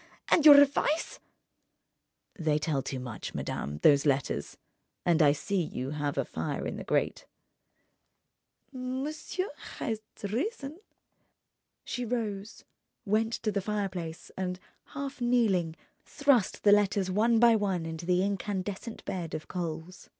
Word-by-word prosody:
And 315 Hz, -2 st, +6 dB
your 290 Hz, -1 st, +11 dB
advice—?" 285 Hz, +3 st, +2 dB, 1.1 s
"They 155 Hz, -4 st, +1 dB
tell 150 Hz, -2 st, 0 dB
too 130 Hz, 0 st, -4 dB
much, 120 Hz, -3 st, -6 dB
madame, 75 Hz, +1 st, -3 dB
those 140 Hz, -2 st, +6 dB
letters. 135 Hz, -, 0 dB, 0.5 s
And 170 Hz, -1 st, +4 dB
I 145 Hz, -2 st, +7 dB
see 185 Hz, +6 st, -1 dB
you 135 Hz, -4 st, -4 dB
have 145 Hz, -1 st, -2 dB
a -, -, +1 dB
fire -, -, -3 dB
in -, -, -4 dB
the -, -, -6 dB
grate -, -, -1 dB, 0.7 s
..." -, -, -50 dB
"Monsieur 270 Hz, +9 st, -3 dB, 0.3 s
has 220 Hz, -2 st, -2 dB, 0.2 s
reason...." 280 Hz, -, -3 dB, 1.1 s
She 250 Hz, -, -3 dB
rose, 220 Hz, -4 st, -3 dB, 0.4 s
went 220 Hz, +2 st, +1 dB
to 220 Hz, -2 st, -1 dB
the 200 Hz, -1 st, -1 dB
fireplace 190 Hz, -5 st, -4 dB
and, 180 Hz, -1 st, -3 dB, 0.3 s
half 275 Hz, -1 st, -6 dB
kneeling, 210 Hz, -10 st, +2 dB, 0.3 s
thrust 280 Hz, -8 st, +1 dB
the 205 Hz, -, +6 dB
letters 205 Hz, -2 st, +3 dB
one 225 Hz, +4 st, +3 dB
by 235 Hz, 0 st, +6 dB
one 195 Hz, -6 st, 0 dB
into 165 Hz, +1 st, -6 dB
the 180 Hz, 0 st, +3 dB
incandescent 200 Hz, +2 st, -3 dB
bed 170 Hz, -4 st, -4 dB
of 155 Hz, -, -6 dB
coals. 170 Hz, 0 st, -5 dB
200 Hz, 135 wpm, -29 LUFS, 165-240 Hz, 1.1 s, your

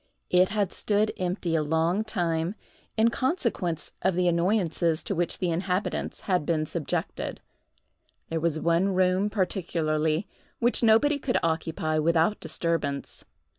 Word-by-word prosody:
It 180 Hz, +1 st, +5 dB
had 205 Hz, -3 st, -1 dB
stood 210 Hz, +1 st, +1 dB
empty 180 Hz, -2 st, -2 dB
a 160 Hz, -, +2 dB
long 160 Hz, +6 st, +1 dB
time, 175 Hz, -3 st, -1 dB, 0.4 s
in 220 Hz, +1 st, +5 dB
consequence 235 Hz, -, -1 dB
of 190 Hz, -2 st, +1 dB
the 180 Hz, 0 st, +2 dB
annoyances 170 Hz, -2 st, +1 dB
to -, -, -2 dB
which 175 Hz, -1 st, -1 dB
the 180 Hz, -2 st, -1 dB
inhabitants 180 Hz, +3 st, -2 dB
had 180 Hz, -5 st, 0 dB
been 155 Hz, 0 st, 0 dB
subjected. 155 Hz, -1 st, -3 dB, 0.9 s
There 165 Hz, -, -1 dB
was 160 Hz, -1 st, 0 dB
one 170 Hz, +4 st, +2 dB
room, 185 Hz, +2 st, +2 dB
particularly, 165 Hz, -4 st, 0 dB, 0.3 s
which 240 Hz, +1 st, +2 dB
nobody 240 Hz, +6 st, +4 dB
could 265 Hz, -3 st, 0 dB
occupy 160 Hz, -1 st, 0 dB
without 165 Hz, +5 st, +2 dB
disturbance. 160 Hz, -3 st, -2 dB
175 Hz, 130 wpm, -27 LUFS, 160-200 Hz, 0.9 s, It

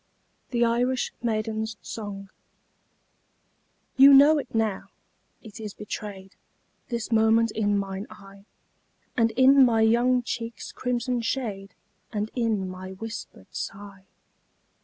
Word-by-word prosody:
] -, -, -44 dB
THE 240 Hz, -1 st, +2 dB
IRISH 245 Hz, +2 st, 0 dB
MAIDEN'S 220 Hz, -1 st, -2 dB
SONG 200 Hz, -3 st, -7 dB, 1.7 s
You 275 Hz, +1 st, +9 dB
know 295 Hz, +3 st, +7 dB
it 275 Hz, -, -6 dB
now 220 Hz, -3 st, 0 dB, 0.6 s
it 220 Hz, -1 st, -11 dB
is 210 Hz, -2 st, -7 dB
betrayed 200 Hz, -2 st, -7 dB, 0.5 s
This 235 Hz, -2 st, -4 dB
moment 225 Hz, 0 st, +3 dB
in 205 Hz, -2 st, 0 dB
mine 195 Hz, +1 st, -4 dB
eye, 195 Hz, 0 st, -15 dB, 0.7 s
And 230 Hz, -1 st, +3 dB
in 265 Hz, +3 st, +6 dB
my 230 Hz, -3 st, +3 dB
young 240 Hz, +3 st, +3 dB
cheeks' 230 Hz, -2 st, -5 dB
crimson 245 Hz, 0 st, -2 dB
shade, 210 Hz, -6 st, -4 dB, 0.4 s
And 210 Hz, +1 st, -3 dB
in 220 Hz, -6 st, 0 dB
my 185 Hz, +1 st, -8 dB
whispered 225 Hz, +4 st, -9 dB
sigh. 195 Hz, -1 st, -7 dB
220 Hz, 115 wpm, -26 LUFS, 205-240 Hz, 1.7 s, You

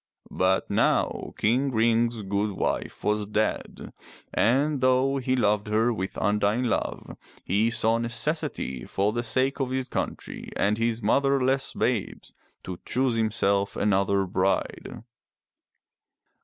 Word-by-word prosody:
But 95 Hz, +1 st, +1 dB
now -, -, 0 dB
King 130 Hz, +6 st, +1 dB
Ring's 115 Hz, -1 st, +1 dB
good 100 Hz, +1 st, -1 dB
wife -, -, -3 dB
was 105 Hz, 0 st, 0 dB
dead, 105 Hz, +1 st, -2 dB, 0.4 s
and 140 Hz, +4 st, +2 dB
though 130 Hz, +2 st, +3 dB
he 130 Hz, -1 st, 0 dB
loved 105 Hz, -3 st, +1 dB
her 110 Hz, +3 st, +2 dB
with 95 Hz, -3 st, -5 dB
undying 105 Hz, +4 st, +1 dB
love, 120 Hz, -, -2 dB, 0.3 s
he 105 Hz, +5 st, +1 dB
saw 115 Hz, 0 st, +1 dB
necessity, 115 Hz, -, -2 dB
for 100 Hz, +10 st, -1 dB
the 120 Hz, -, -1 dB
sake 130 Hz, +4 st, 0 dB
of 135 Hz, -2 st, -1 dB
his 130 Hz, 0 st, -2 dB
country -, -, -5 dB
and 105 Hz, +2 st, +1 dB
his 115 Hz, -1 st, -1 dB
motherless 135 Hz, +3 st, +2 dB
babes, 120 Hz, -6 st, -2 dB, 0.3 s
to 90 Hz, -1 st, -7 dB
choose 130 Hz, 0 st, 0 dB
himself 105 Hz, -3 st, +1 dB
another 100 Hz, -1 st, +1 dB
bride. 95 Hz, +3 st, -2 dB
115 Hz, 125 wpm, -26 LUFS, 100-130 Hz, 0.4 s, though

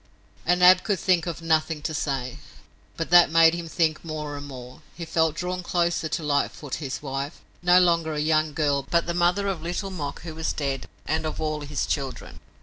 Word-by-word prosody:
And 180 Hz, +1 st, +3 dB
Ab 180 Hz, 0 st, +8 dB
could 205 Hz, -3 st, 0 dB
think 180 Hz, -2 st, +2 dB
of 165 Hz, -1 st, -5 dB
nothing 160 Hz, -1 st, +1 dB
to 155 Hz, -, -2 dB
say. 135 Hz, -4 st, -3 dB, 0.6 s
But 165 Hz, 0 st, -4 dB
that 175 Hz, -1 st, +8 dB
made 165 Hz, 0 st, +6 dB
him 170 Hz, -1 st, -4 dB
think 160 Hz, -2 st, 0 dB
more 155 Hz, -2 st, -5 dB
and 145 Hz, 0 st, -7 dB
more. 125 Hz, -2 st, -10 dB
He 170 Hz, -, -6 dB
felt 160 Hz, -1 st, +1 dB
drawn 180 Hz, +2 st, -3 dB
closer 170 Hz, -2 st, 0 dB
to 160 Hz, -, -2 dB
Lightfoot, 145 Hz, -1 st, -1 dB
his 135 Hz, 0 st, -5 dB
wife, 135 Hz, +2 st, -4 dB, 0.2 s
no 175 Hz, +1 st, +6 dB
longer 170 Hz, -3 st, +2 dB
a -, -, -2 dB
young 155 Hz, 0 st, +1 dB
girl, 145 Hz, -3 st, +1 dB
but 170 Hz, -1 st, +2 dB
the 170 Hz, -, -2 dB
mother 180 Hz, +3 st, +2 dB
of 190 Hz, -5 st, -2 dB
Little 180 Hz, +4 st, -3 dB
Mok, 145 Hz, -6 st, -5 dB
who 165 Hz, -2 st, -6 dB
was 160 Hz, 0 st, -2 dB
dead, 135 Hz, -3 st, -3 dB, 0.2 s
and 155 Hz, +2 st, -1 dB
of 155 Hz, -, -4 dB
all 155 Hz, -1 st, -2 dB
his 145 Hz, 0 st, -2 dB
children. 135 Hz, -2 st, -4 dB
160 Hz, 205 wpm, -25 LUFS, 145-175 Hz, 0.6 s, Ab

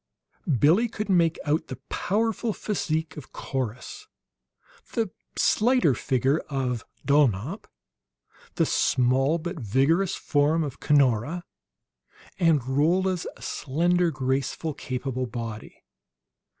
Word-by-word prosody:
Billie 170 Hz, -, +4 dB
could 210 Hz, -1 st, -5 dB
make 170 Hz, -4 st, +3 dB
out 150 Hz, +2 st, 0 dB
the -, -, -5 dB
powerful 225 Hz, +2 st, -1 dB
physique 160 Hz, -8 st, -2 dB
of 150 Hz, -, -10 dB
Corrus, 135 Hz, -, -5 dB, 0.9 s
the 225 Hz, -6 st, -1 dB, 0.3 s
slighter 240 Hz, -, +3 dB
figure 135 Hz, +5 st, +1 dB
of 125 Hz, -5 st, -2 dB, 0.2 s
Dulnop, 140 Hz, -, +1 dB, 0.9 s
the -, -, +3 dB
small 130 Hz, +5 st, +2 dB
but 170 Hz, +1 st, -5 dB
vigorous 140 Hz, -, +2 dB
form 150 Hz, +3 st, +1 dB
of 140 Hz, -4 st, -6 dB
Cunora, 145 Hz, +3 st, +2 dB, 1.0 s
and 160 Hz, -8 st, +3 dB
Rolla's 175 Hz, +7 st, +1 dB
slender, 175 Hz, +5 st, 0 dB
graceful, 135 Hz, +2 st, -2 dB
capable 130 Hz, -1 st, -3 dB
body. 115 Hz, -2 st, -7 dB
150 Hz, 100 wpm, -26 LUFS, 130-175 Hz, 1.0 s, Billie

